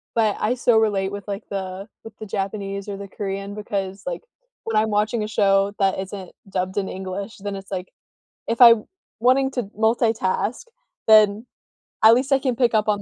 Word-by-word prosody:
But 220 -3 +2
I 235 - +1
still 240 -2 +3
relate 200 -3 +1
with 200 0 -7
like 200 +1 -4
the 190 +1 -5 0.2
with 225 - -10
the 215 - -7
Japanese 200 0 -4
or 200 - -4
the 200 0 -8
Korean 195 0 -5
because 200 -2 -4
like - - -4 0.4
when 225 -1 -2
I'm 215 +1 +2
watching 210 +2 0
a - - -5
show 195 -1 +2
that 195 -1 +1
isn't 190 -1 -6 0.2
dubbed 185 0 -3
in 195 - -1
English, 190 +3 -6
then 200 0 -5
it's 195 0 -10
like, 185 -1 -5 0.6
if 230 +2 -2
I 235 -1 +11 0.5
wanting 260 +3 +3
to 245 -3 -2
multitask, 225 -1 0 0.4
then 215 0 +6 0.6
at 220 +1 +9
least 260 +3 +1
I 275 - +5
can 260 -2 -1
pick 240 -1 +2
up 215 0 +2
on 205 -1 +1
205 Hz, 190 wpm, -22 LUFS, 195-225 Hz, 0.6 s, I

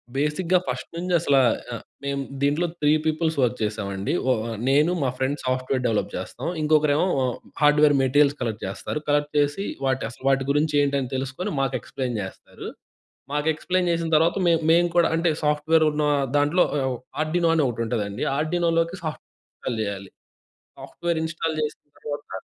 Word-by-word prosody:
బేసిక్‌గా 160 +6 +1
ఫస్ట్ - - -4
నుంచి 180 +1 -2
అసలా 140 -4 +3 0.3
ఆహ్, - - -5 0.2
మేము 140 0 -2 0.2
దీంట్లో 145 +5 +2 0.2
3 145 - +4
పీపుల్స్ 160 0 0
వర్క్ 120 -4 +1
చేశామండి. 100 -1 -2 0.2
ఓ - - +5 0.4
నేను 150 +5 +4
మా 130 - +1
ఫ్రెండ్స్ 135 +2 -2
సాఫ్ట్‌వేర్ 130 0 0
డెవలప్ 110 -2 0
చేస్తాం. - - -6
ఇంకొకరేమో 150 +2 +3 0.5
హార్డ్‌వేర్ 150 0 +5
మెటీరియల్స్ 145 +2 +3
కలెక్ట్ 110 -3 -3
చేస్తారు. 100 +9 -4
కలెక్ట్ 145 0 +1
చేసి, 145 +8 0 0.2
వాటి 130 0 0
అసలు 125 - -14
వాటి 135 -1 +2
గురించి 150 +1 +1
ఏంటి 140 0 +1
అని 125 - -5
తెలుసుకొని 135 +9 -3
మాకు 135 -1 0
ఎక్స్‌ప్లేన్ 125 -4 -4
చేస్తారు. 95 - -9 0.7
మాకు 150 +1 0
ఎక్స్‌ప్లేన్ 180 +3 0
చేసిన 165 -1 -1
తరువాత 165 +4 +3
మే 170 - +5 0.2
మేము 175 +1 +5
కూడా 170 - +5
అంటే 165 +1 +2
సాఫ్ట్‌వేర్ 155 +2 +3
ఉన్న 150 0 -1 0.3
దాంట్లో 150 +5 +3 0.2
ఆహ్, 130 -2 -1 0.2
ఆర్డినో 165 +2 +1
అని 160 - +3
ఒకటి 115 -1 -2
ఉంటదండి 105 -4 -2
ఆర్డినోలోకి 165 +2 0
సాఫ్ట్‌వేర్ 155 -2 -8
ఇన్‌‌స్టాల్ 115 -3 -4
చేయాలి. 100 -2 -5 0.7
సాఫ్ట్‌వేర్ 170 -2 -3
ఇన్‌స్టాల్ 165 -1 -2
చేసిన 150 - -4 0.2
తర్వాత 145 -10 -6
150 Hz, 155 wpm, -24 LUFS, 130-165 Hz, 0.7 s, ఓ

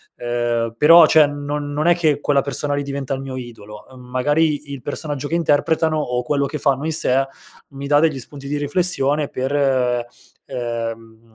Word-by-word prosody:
ehm 120 -1 -2
però 165 +4 +8
cioè, 155 -1 +6
non 145 0 -4
non 155 +3 0
è 175 - +5
che 155 -4 +1
quella 140 -1 +2
persona 145 +1 -1
lì 145 - -2
diventa 140 -1 -4
il 135 - -3
mio 135 -1 -6
idolo. 115 -4 -10
Uhm, 130 -1 -14
magari 145 +4 0
il 135 -3 -7
personaggio 145 -1 -4
che 165 - -6
interpretano 160 0 +1
o 125 -4 -1
quello 140 +2 0
che 150 - -4
fanno 140 +1 0
in 160 - -1
sé, 135 -3 +2 0.4
mi 140 0 -7
dà 145 0 +4
degli 155 -4 +1
spunti 140 +2 -10
di 145 +1 -2
riflessione 145 -2 0
per 130 +1 -3 0.9
ehm, 115 -1 -6
140 Hz, 180 wpm, -20 LUFS, 125-150 Hz, 0.9 s, però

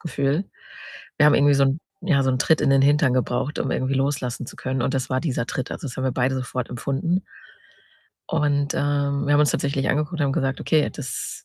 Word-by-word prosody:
Gefühl. 145 +1 -1 0.7
Wir 150 - +5
haben 150 - +6
irgendwie 145 0 +4
so 140 0 +4
'n 135 +3 +1 0.2
ja, 155 -7 +2
so 130 - +1
'n 130 - 0
Tritt 160 +4 +3
in - - +2
den 135 0 +4
Hintern 140 -2 +3
gebraucht, 130 +4 -1
um 135 - -1
irgendwie 130 +2 -1
loslassen 135 -2 -1
zu - - -11
können 130 -1 -2
und 130 - 0
das 130 -1 -1
war 130 0 +1
dieser 130 -7 -2
Tritt. 130 - -4
Also, - - -6
das 125 - -7
haben 130 - -3
wir 130 - 0
beide 130 +1 0
sofort 125 -1 -4
empfunden. 140 +9 -1 1.1
Und, 145 -2 0
ähm, 140 0 0
wir 145 - +2
haben 145 - +5
uns 150 - +4
tatsächlich 140 -1 -1
angeguckt 150 +4 0
und 165 - -4
haben 135 - 0
gesagt, 135 0 -1
okay, 155 -2 +2
das 135 -5 -6
140 Hz, 225 wpm, -23 LUFS, 130-145 Hz, 1.1 s, haben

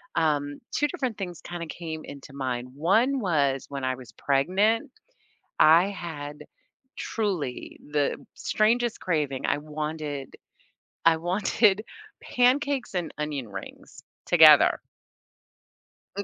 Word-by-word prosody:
um, 145 -3 0
2 295 - +1
different 260 - -3
things 180 -4 -6
kinda 175 -1 -6
came 160 -1 -6
into 140 0 -11
mind; 125 -2 -3
one 225 - +2
was 145 - +1
when 140 -1 -6
I 130 0 0
was 125 -4 -13
pregnant, 200 - +1 0.7
I 165 +4 +7
had 150 -6 -7 0.5
truly 185 - -3
the 145 -2 +1 0.2
strangest 235 +2 +1
craving, 150 -6 -1
I - - +1
wanted 150 -2 -5 0.7
I 165 -1 +6
wanted 195 +4 +2 0.4
pancakes 265 0 +1
and 175 -3 -2
onion 145 -5 -3
rings 95 -1 -10 0.2
together. - - +7 1.4
Mm 200 - -2
160 Hz, 110 wpm, -26 LUFS, 145-205 Hz, 1.4 s, I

